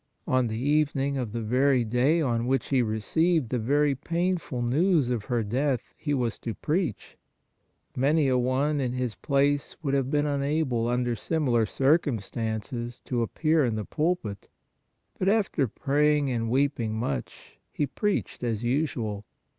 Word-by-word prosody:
On 130 -1 +2
the 110 0 -3
evening 140 +1 +1
of 120 -5 -3
the 115 0 -3
very 130 +3 +3
day 130 +9 +2
on 120 -3 0
which 135 -1 0
he 135 -2 +3
received 125 - +1
the 125 - -1
very 145 +5 +2
painful 170 -3 -2
news 145 +1 +2
of 115 -4 -2
her 120 -3 0
death 130 +5 -1
he 145 - -4
was 125 -5 -1
to 115 - -5
preach. 160 - -2 0.8
Many 145 +3 +2
a 130 - +2
one, 130 +4 +1
in 125 -2 -1
his 125 -3 -2
place, 140 +2 0
would 140 -2 -1
have 135 -2 +1
been 145 +1 +1
unable, 140 -4 0
under 120 0 0
similar 125 -5 +1
circumstances, 120 - -1
to 120 -2 -1
appear 155 +7 +1
in 120 -4 0
the 105 -1 -3
pulpit; 150 - -2 0.7
but 190 - +2
after 200 - +1
praying 145 +3 +1
and 115 -2 -1
weeping 130 -4 +1
ii8 110 - -3
PRAYER 115 - -1
much, 65 -3 -7
he 145 - 0
preached 205 - -2
as 115 -2 -1
usual. 120 -6 -1
130 Hz, 160 wpm, -27 LUFS, 120-150 Hz, 0.8 s, very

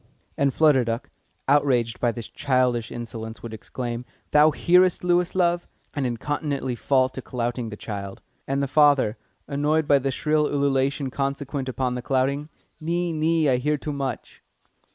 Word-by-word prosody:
And 140 -1 +2
Flutter 150 -3 +4
Duck, 115 +1 -4 0.4
outraged 130 -5 +2
by 120 - +2
this 115 -1 -7
childish 125 -4 0
insolence, 110 -2 -7
would 115 -1 -6
exclaim, 120 +2 -5 0.3
"Thou 150 +1 +6
hearest, 180 +4 +3
Lewis, 180 0 +2
love?" 175 -1 +1 0.3
and 140 -3 -1
incontinently 140 +2 -2
fall 130 +2 +2
to 130 - -7
clouting 120 -1 -3
the 105 - -8
child. 100 -3 -6 0.3
And 140 +1 0
the - - 0
father, 140 -6 +4 0.3
annoyed 150 +2 +1
by 140 -2 +5
the 135 +1 -1
shrill 150 +3 +1
ululation 140 -1 0
consequent 140 0 -3
upon 125 0 -1
the 125 - -3
clouting: 135 +4 0 0.3
"Nee, 170 +2 -1
nee, 160 0 +2
I 130 -2 +3
hear 150 +4 0
too 150 +1 -5
much." 135 -4 -5
135 Hz, 155 wpm, -24 LUFS, 125-150 Hz, 0.4 s, Thou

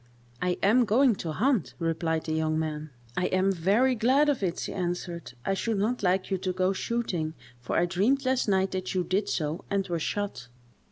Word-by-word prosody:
"I 180 0 0
am 230 +5 +5
going 245 +4 +4
to 165 - -4
hunt," 235 - +1
replied 165 -1 -1
the 155 - -3
young 155 0 0
man. 155 -1 -3 0.3
"I 180 - +1
am 185 +1 +2
very 200 +9 +3
glad 260 +6 +3
of 280 -6 0
it," 175 -3 -1
she - - -4
answered. 175 -4 -4
"I 195 - +1
should 220 +2 -1
not 225 +5 0
like 185 0 +1
you 190 - +1
to 185 0 -1
go 185 +1 +1
shooting, 185 -8 -2 0.2
for 120 - -2
I 175 - +4
dreamed 215 +10 +1
last 260 -1 +1
night 190 -1 +2
that 185 0 -3
you 180 - +2
did 190 +4 0
so, 155 +3 -2
and 195 -1 0
were 170 -2 -1
shot." 195 - -3
185 Hz, 205 wpm, -28 LUFS, 170-215 Hz, 0.3 s, am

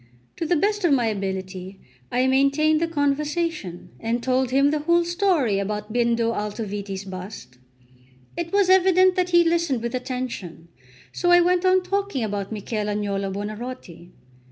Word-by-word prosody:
To 330 - -2
the 350 - +2
best 410 +5 0
of 345 - +3
my 250 -4 +2
ability 190 -2 -4 0.3
I 250 +1 +2
maintained 275 +4 +3
the 335 - +1
conversation, 295 - -2
and 235 +1 -2
told 260 0 +1
him 275 +2 +3
the 305 - 0
whole 340 +3 +2
story 345 - +1
about 210 +2 -4
Bindo 235 -1 +1
Altoviti's 205 -2 -4
bust. 185 -9 -9 0.8
It 340 0 -4
was 400 -1 +3
evident 370 0 +5
that 365 -1 0
he 345 -1 +5
listened 330 -8 0
with 235 +1 -3
attention; 250 -10 -5 0.4
so 350 - -1
I 350 0 +7
went 360 +1 +2
on 370 0 +4
talking 395 - -2
about 200 -2 -3
Michel 215 0 -3
Agnolo 200 -2 -2
Buonarroti. 205 -4 -7
255 Hz, 155 wpm, -23 LUFS, 205-340 Hz, 0.8 s, I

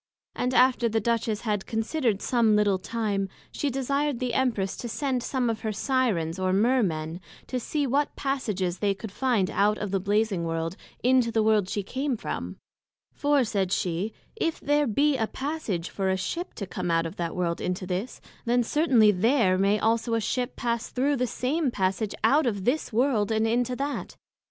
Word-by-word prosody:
And 250 +1 -1
after 250 -2 +4
the 225 0 +1
Duchess 225 -1 0
had 210 -4 -2
considered 225 -1 -1
some 230 -4 +3
little 205 -2 +3
time, 205 -2 -2 0.2
she 290 - -1
desired 275 +1 0
the 250 0 -2
Empress 225 -8 0
to 240 - -5
send 265 0 -1
some 255 0 -1
of 225 -1 -1
her 220 - -3
Syrens 205 - 0
or 185 0 +1
Mear 240 +7 +3
men, 160 -2 -2 0.2
to 255 - -3
see 290 +4 -1
what 280 +3 0
passages 210 -10 -2
they 200 -1 +1
could 205 +1 -8
find 220 -5 +1
out 210 +1 +2
of 205 -2 -4
the 195 - +1
Blazing 205 -1 +1
World, 165 +1 -2 0.3
into 250 -1 +4
the 220 -1 +2
World 215 -3 +3
she 205 - -2
came 260 +4 -2
from; - - -5 0.6
for, 290 -2 +2
said 195 -5 -1
she, 180 +3 -1 0.2
if 330 -7 -1
there 295 0 +2
be 280 +5 +2
a 220 -3 0
passage 265 - -3
for 190 -1 -1
a 190 - +1
Ship 335 - -3
to 200 - -4
come 175 -1 -4
out 165 0 +2
of 165 +5 -6
that 170 -1 -3
World 170 -2 -1
into 180 +1 -2
this; 185 +6 -4 0.2
then 240 +1 +3
certainly 245 -6 +4
there 210 0 +3
may 200 +2 +3
also 225 +1 +1
a - - +2
Ship 245 +3 -2
pass 235 -1 -2
thorow 280 +3 +1
the 250 -1 0
same 280 +5 0
passage 195 0 -1
out 290 -1 +4
of 200 -4 -2
this 270 +3 0
World 230 -3 +2
into 225 +3 +1
that. 280 +2 -4
225 Hz, 190 wpm, -26 LUFS, 195-255 Hz, 0.6 s, after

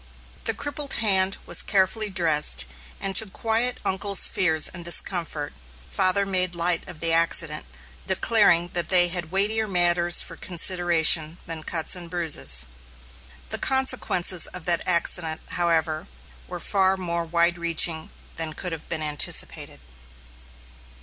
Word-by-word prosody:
The - - -1
crippled 290 -1 -6
hand 195 -3 0
was - - +2
carefully 205 +2 0
dressed, 150 - +1 0.3
and 195 0 -5
to 220 - +5
quiet 230 +5 0
uncle's 195 0 +3
fears 160 -4 +1
and 175 -2 -9
discomfort, 170 -3 -1 0.3
father 190 - +1
made 185 -2 +1
light 170 +1 0
of 160 -4 -11
the 165 -1 +3
accident, 165 -2 +1 0.4
declaring 190 -3 +2
that 175 -1 -1
they 175 -2 +4
had 175 -2 -5
weightier 215 +3 +1
matters 175 -2 +2
for - - -10
consideration 170 -2 +2
than 165 -1 -7
cuts 160 +3 -1
and 175 -2 -10
bruises. 150 - +3 0.9
The - - -2
consequences 255 -10 0
of 180 -3 -10
that 170 -1 +2
accident, 170 -2 -1
however, 165 -2 -2 0.4
were - - -8
far 190 -1 +1
more 170 -2 -3
wide 170 +1 0
reaching 165 -1 +1 0.3
than 160 -1 -2
could 180 +2 -6
have 160 -2 -7
been 160 -2 -4
anticipated. 150 -1 -1
175 Hz, 135 wpm, -23 LUFS, 165-190 Hz, 0.9 s, to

